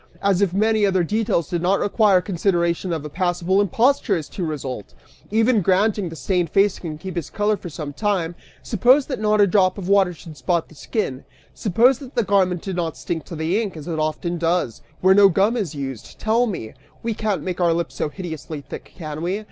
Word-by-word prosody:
As 200 -1 +2
if 200 -4 +2
many 215 +3 +2
other 190 -3 +3
details 205 -3 0
did 175 -2 -2
not 185 +3 +2
require 205 -3 +3
consideration 175 -1 0
if 160 -3 -2
a - - -5
passable 180 +3 +1
imposture 225 +1 +2
is 155 - -5
to 185 - -5
result! 135 -8 -5 0.3
Even 225 +1 +3
granting 195 +3 +2
that - - -4
the 165 - -8
stained 175 +3 0
face 195 +2 +2
can 155 -3 -6
keep 185 +4 -7
its 170 -4 -3
color 210 0 +1
for 180 - -8
some 150 -2 -6
time, 185 -2 -1 0.3
suppose 260 +7 +4
that 265 - -4
not 215 0 +2
a - - +7
drop 185 -1 +2
of 190 -3 -5
water 195 -2 +4
should 165 -2 -12
spot 165 +6 -1
the - - -16
skin, 145 - -3 0.3
suppose 235 +6 +3
that 265 -2 -11
the 235 - +2
garment 185 -3 +1
did 190 -2 -4
not 165 -3 -2
stick 165 -2 -4
to 170 - -8
the 165 +7 0
ink, 200 -7 -5
as 150 - -9
it 165 -2 -2
often 160 +3 -2
does, 165 -7 0 0.2
where 190 +1 +6
no 200 0 +7
gum 195 +6 +2
is 195 - -2
used, 135 -4 -6
tell 230 +3 +2
me! 145 - -5 0.3
We 230 0 -1
can't 210 -2 -2
make 180 -1 -3
our 170 -1 +4
lips 170 +1 -1
so - - -2
hideously 160 -1 -6
thick, - - -10
can 155 -3 -6
we? 180 +4 -1
185 Hz, 220 wpm, -22 LUFS, 165-205 Hz, 0.3 s, a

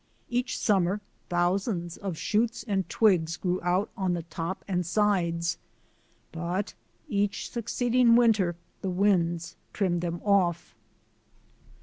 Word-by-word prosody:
Each 245 +1 -1
summer 195 -1 +2 0.3
thousands 175 0 0
of 190 -5 -5
shoots 225 +4 0
and 195 -3 -1
twigs 175 -7 +3
grew 180 0 -1
out 180 +4 0
on 190 -4 0
the 170 -1 -3
top 170 +2 -5
and 180 -2 0
sides, 170 -3 +1 0.7
but 175 +5 -3 0.3
each 205 -1 -1
succeeding 240 0 +3
winter 215 -7 +4 0.3
the 190 - -2
winds 180 -3 +1 0.2
trimmed 175 -4 0
them 170 0 -3
off. 180 -5 +2
185 Hz, 115 wpm, -28 LUFS, 175-210 Hz, 0.7 s, winter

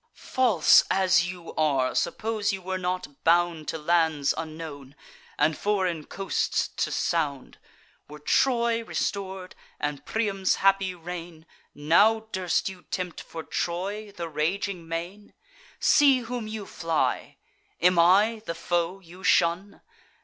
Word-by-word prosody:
False 225 -12 +4
as 185 -2 +3
you 175 -2 -10
are, 140 -5 +1
suppose 215 +3 -1
you 195 - -4
were 190 0 -4
not 180 -6 -4
bound 170 -2 +2
To 160 - -2
lands 160 -3 +1
unknown, 155 -4 -7 0.4
and 150 +1 +2
foreign 185 -7 -1
coasts 195 0 -1
to - - -2
sound; 145 -6 -2 0.5
Were 150 - -10
Troy 235 - +1
restor'd, 190 -4 -4 0.3
and 145 -1 -3
Priam's 200 -4 0
happy 195 -1 +2
reign, 170 -1 -8 0.3
Now 200 +10 +4
durst 185 -3 0
you 190 -2 -7
tempt, 180 -2 -4
for 165 -1 -8
Troy, 200 +7 -3
the 175 -4 -6
raging 170 +3 -2
main? 175 +5 -6 0.4
See 275 -4 +5
whom 240 -1 -5
you 215 -1 -6
fly! 165 -4 -2 0.4
am 180 0 +4
I 205 +6 +4
the 170 - -3
foe 175 +2 -1
you 180 +2 -14
shun? 180 +3 +2
180 Hz, 125 wpm, -26 LUFS, 165-200 Hz, 0.5 s, See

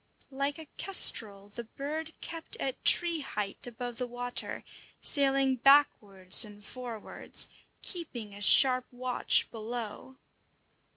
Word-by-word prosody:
Like 275 +1 -3
a 320 - -11
kestrel, 205 - +3
the 235 +3 -8
bird 305 +7 -7
kept 330 -1 -8
at 265 -1 -6
tree 340 -2 +4
height 210 -6 -6
above 245 0 -8
the 250 - -3
water, 245 0 -6 0.4
sailing 270 -2 +1
backwards 215 -9 +3
and 205 -1 -13
forwards, 240 -4 -5 0.4
keeping 245 - -6
a 205 - -12
sharp 255 +4 +6
watch 250 0 +1
below. 230 +2 -8
250 Hz, 115 wpm, -29 LUFS, 220-275 Hz, 0.4 s, sharp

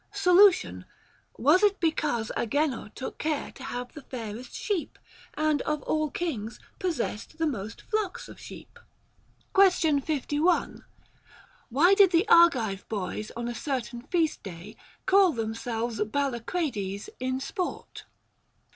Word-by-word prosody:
Solution. 390 -1 +4 0.5
Was 300 - +4
it 410 -1 +3
because 295 -9 0
Agenor 270 -1 -1
took 260 - -6
care 305 -2 -2
to 270 - -12
have 245 -1 -5
the 300 - -9
fairest 235 -2 -7
sheep, 395 -7 -3 0.4
and 305 -2 +1
of 300 -2 -2
all 310 -1 0
kings 245 -10 -4 0.2
possessed 315 - -3
the 325 - 0
most 225 -7 -4
flocks 425 -4 -2
of - - -12
sheep? - - -12 0.7
Question 355 -7 +4
51. 300 +4 0 0.9
Why 310 +10 +5
did 395 -1 +7
the 345 +4 +2
Argive 250 - +4
boys 210 0 -3
on 235 0 -3
a 240 - -3
certain 250 -3 -3
feast 320 +3 0
day 190 +2 -9 0.3
call 385 -3 +5
themselves 230 0 -3
Ballacrades 235 - -2
in 260 +1 -1
sport? 360 +6 -5
285 Hz, 125 wpm, -27 LUFS, 230-340 Hz, 0.9 s, did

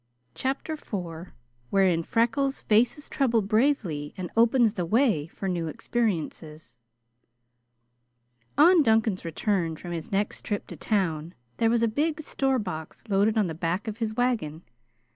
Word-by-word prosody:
CHAPTER 270 +4 -2
IV 175 - -6 0.4
Wherein 185 -4 +3
Freckles 240 - 0
Faces 235 +7 +2
Trouble 235 -6 +1
Bravely 205 - 0
and 180 -2 -5
Opens 230 -1 +4
the 180 - -2
Way 210 - +2
for 195 - -6
New 175 -3 -1
Experiences 160 - -3 1.8
On 340 +3 +7
Duncan's 220 -6 +2
return 170 0 -1
from 175 +2 -8
his 165 -2 -5
next 205 +1 -1
trip 205 -1 -3
to - - -9
town 170 -5 -1 0.2
there 225 - +3
was 230 0 +2
a - - +4
big 300 +8 0
store 270 -3 0
box 180 -8 -6
loaded 205 +3 +2
on 215 - +3
the 165 - -3
back 170 +6 -2
of 220 +1 -5
his 220 -2 -2
wagon. 215 -11 -1
210 Hz, 145 wpm, -26 LUFS, 170-235 Hz, 1.8 s, On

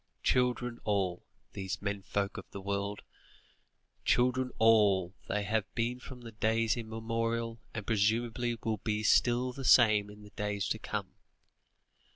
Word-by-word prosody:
Children 125 -1 +1
all, 95 -4 0 0.3
these 95 -1 -4
men 100 0 -3
folk 100 +1 -2
of - - -8
the 100 - -7
world! 100 +1 -3 1.0
Children 125 +1 +2
all, 105 -5 +4
they 105 - -1
have 105 0 -1
been 120 +1 -1
from 125 0 -10 0.2
days 115 +1 +2
immemorial, 115 0 -2 0.2
and 105 -3 -4
presumably 115 +2 +1
will 110 -1 0
be 105 +1 -2
still 125 +2 +3
the 135 - -7
same 110 -5 +5
in 105 0 -13
the 105 - -14
days 105 -1 -2
to - - -1
come. - - -4
110 Hz, 140 wpm, -31 LUFS, 100-120 Hz, 1.0 s, same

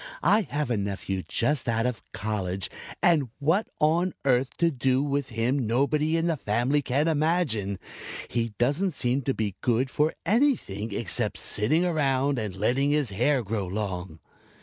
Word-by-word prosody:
I 215 - +5
have 145 -3 -1
a 115 - +1
nephew 100 -1 -3
just 120 -1 0
out 115 0 +1
of 125 -3 -2
college 95 -3 -3 0.3
and 155 -7 +4
what 165 +9 +1
on 165 +4 +2
earth 130 -1 +3
to 170 -1 +3
do 130 0 +1
with 140 -1 -1
him 120 +2 0
nobody 150 +7 +2
in 165 - +1
the 170 -2 +1
family 125 +6 +1
can 140 +3 0
imagine. 150 - +1 0.5
He 115 -2 -2
doesn't 150 +10 +1
seem 130 0 +1
to 135 0 -1
be 105 -3 -2
good 125 +2 +1
for 150 +2 +1
anything 195 - +1
except 100 - -1
sitting 155 +12 +1
around 140 -5 +1
and 105 -4 -4
letting 125 +8 +1
his 145 -6 +1
hair 125 +6 +2
grow 100 -2 -2
long." 90 -4 -4
130 Hz, 160 wpm, -27 LUFS, 110-150 Hz, 0.5 s, I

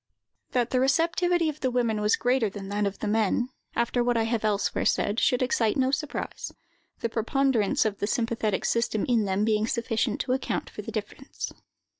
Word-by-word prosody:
That 245 -2 +1
the 255 - +2
receptivity 335 +5 +2
of 305 -1 -3
the 260 - 0
women 235 -4 0
was 210 +1 +3
greater 245 -3 +1
than 195 0 -8
that 205 0 0
of 200 - -4
the 215 - -4
men, 220 +3 +1 0.3
after 235 +1 +1
what 240 -1 +1
I 225 - +2
have 225 -1 -1
elsewhere 210 -1 0
said, 205 +3 +1
should 250 -1 +2
excite 230 -4 +1
no 260 0 +2
surprise; 290 +1 -3 0.5
the - - +1
preponderance 230 -1 +1
of 205 -2 -1
the 205 - -1
sympathetic 225 -3 -1
system 230 -2 +1
in 230 -4 +2
them 195 +2 +1
being 215 0 +2
sufficient 230 -1 -1
to 250 - 0
account 265 - -2
for - - -7
the - - -7
difference. - - -5
230 Hz, 190 wpm, -27 LUFS, 210-255 Hz, 0.5 s, was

